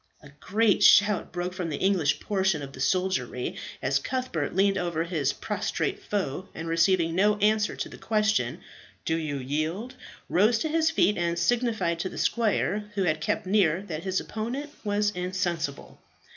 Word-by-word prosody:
A 145 - -13
great 215 +4 +2
shout 205 -1 +5
broke 180 0 -3
from 180 -3 -3
the 150 - -3
English 185 -7 +2
portion 190 -7 0
of 135 0 -8
the - - -11
soldiery 140 -6 -1 0.3
as 135 +1 +2
Cuthbert 210 - -3
leant 195 +1 +3
over 175 -3 -1
his 160 -6 0
prostrate 400 0 -2
foe, 190 - -3
and 165 +1 -5
receiving 165 0 +2
no 205 +4 +3
answer 210 +1 +2
to - - -4
the - - -12
question 215 - 0 0.4
"Do 160 - +1
you 155 -3 -2
yield?" 155 - -3 0.3
rose 215 +6 +3
to 315 - -2
his 320 +1 +2
feet, 210 - +2
and 170 0 0
signified 220 -3 +1
to 185 - -2
the - - -10
squire 210 -2 +1
who 195 - +1
had 155 -3 0
kept - - -1
near 190 -3 +2
that 160 -5 -5
his 190 -1 0
opponent 250 +7 -5
was 205 0 +1
insensible. 180 -5 -3
185 Hz, 170 wpm, -27 LUFS, 165-210 Hz, 0.4 s, shout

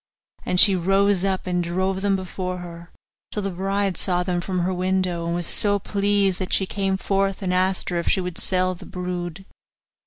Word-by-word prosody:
And 180 - +2
she 195 0 +8
rose 195 +1 +2
up 190 -1 -1
and 180 -1 0
drove 185 +2 -1
them 200 -1 +2
before 185 -1 -4
her, 170 -1 -9 0.4
till 210 - -3
the 195 - -2
bride 195 0 -1
saw 180 -2 +1
them 180 -1 -1
from 185 0 -2
her 185 +2 0
window, 180 -2 -1
and 170 - -1
was 175 -1 -2
so 205 +1 +3
pleased 200 -1 0
that 185 - -3
she 190 - +4
came 195 0 -1
forth 195 0 -1
and 180 -1 0
asked 185 +1 +1
her 175 -1 -1
if 170 - -5
she - - +3
would 180 -1 -3
sell 185 0 +1
the 175 - -12
brood. 180 0 -5
185 Hz, 205 wpm, -23 LUFS, 180-195 Hz, 0.4 s, she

